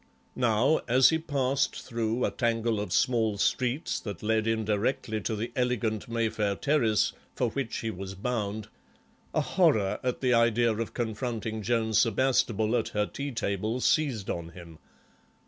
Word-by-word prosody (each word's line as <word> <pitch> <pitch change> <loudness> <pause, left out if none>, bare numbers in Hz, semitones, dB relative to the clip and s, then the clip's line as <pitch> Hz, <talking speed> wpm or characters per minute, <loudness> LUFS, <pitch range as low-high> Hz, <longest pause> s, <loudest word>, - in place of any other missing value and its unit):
Now, 125 +5 +2
as 125 +2 +6
he 160 - +1
passed 140 -3 0
through 115 0 -1
a - - -1
tangle 115 -2 0
of 105 - -4
small 115 -5 +2
streets 125 +8 0
that 100 -5 -7
led 110 0 +1
indirectly 110 0 0
to 110 - -2
the 110 +3 -4
elegant 120 -4 -1
Mayfair 110 -3 0
terrace 115 -6 +2 0.2
for 120 -3 0
which 135 -3 -3
he 115 - -2
was 95 0 -7
bound, 105 0 -3 0.6
a - - +1
horror 145 - +2
at 125 -1 -2
the 125 -2 +2
idea 115 0 +3
of 115 +1 -4
confronting 110 -1 -3
Joan 110 +1 0
Sebastable 115 -1 +2
at 110 - -3
her 105 0 0
tea 140 +6 -5
table 110 +1 -2
seized 130 - +1
on 85 -1 -5
him. 85 -2 -12
115 Hz, 150 wpm, -28 LUFS, 105-125 Hz, 0.6 s, as